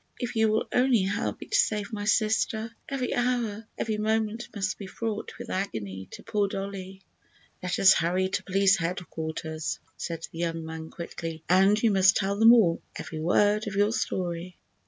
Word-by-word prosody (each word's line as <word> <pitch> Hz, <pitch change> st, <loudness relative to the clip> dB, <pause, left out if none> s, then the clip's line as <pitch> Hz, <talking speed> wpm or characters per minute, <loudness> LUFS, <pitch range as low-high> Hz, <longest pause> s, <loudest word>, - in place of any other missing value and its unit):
If 245 Hz, -2 st, -4 dB
you 220 Hz, -1 st, +3 dB
will 215 Hz, +1 st, +1 dB
only 250 Hz, -4 st, +4 dB
help 200 Hz, +4 st, -2 dB
me -, -, -6 dB
to 415 Hz, -, 0 dB
save 210 Hz, -, +1 dB
my 205 Hz, -1 st, -3 dB
sister! 220 Hz, +1 st, +1 dB, 0.2 s
Every 270 Hz, -2 st, -2 dB
hour, 235 Hz, -3 st, -1 dB
every 215 Hz, -1 st, -1 dB
moment 220 Hz, +2 st, 0 dB
must 195 Hz, -2 st, -2 dB
be 200 Hz, -, -6 dB
fraught 215 Hz, +2 st, -4 dB
with -, -, -7 dB
agony 100 Hz, -, -4 dB
to -, -, -9 dB
poor 205 Hz, -2 st, 0 dB
Dollie." 195 Hz, -1 st, -6 dB, 0.6 s
"Let 180 Hz, 0 st, -2 dB
us 190 Hz, -, +7 dB
hurry 180 Hz, +2 st, +1 dB
to 190 Hz, -, -2 dB
Police 195 Hz, 0 st, +3 dB
Headquarters," 160 Hz, -2 st, -4 dB, 0.2 s
said 165 Hz, -1 st, -4 dB
the 165 Hz, -, -9 dB
young 165 Hz, -1 st, -2 dB
man, 160 Hz, 0 st, -7 dB
quickly, 165 Hz, -1 st, -6 dB
"and 195 Hz, +4 st, +5 dB
you 225 Hz, -, +5 dB
must 190 Hz, -1 st, +5 dB
tell 200 Hz, 0 st, 0 dB
them 225 Hz, +1 st, +9 dB
all—every 170 Hz, -7 st, +1 dB
word 205 Hz, +6 st, +2 dB
of 200 Hz, -, -4 dB
your 205 Hz, +2 st, +3 dB
story." 175 Hz, -3 st, -3 dB
195 Hz, 175 wpm, -27 LUFS, 175-220 Hz, 0.6 s, them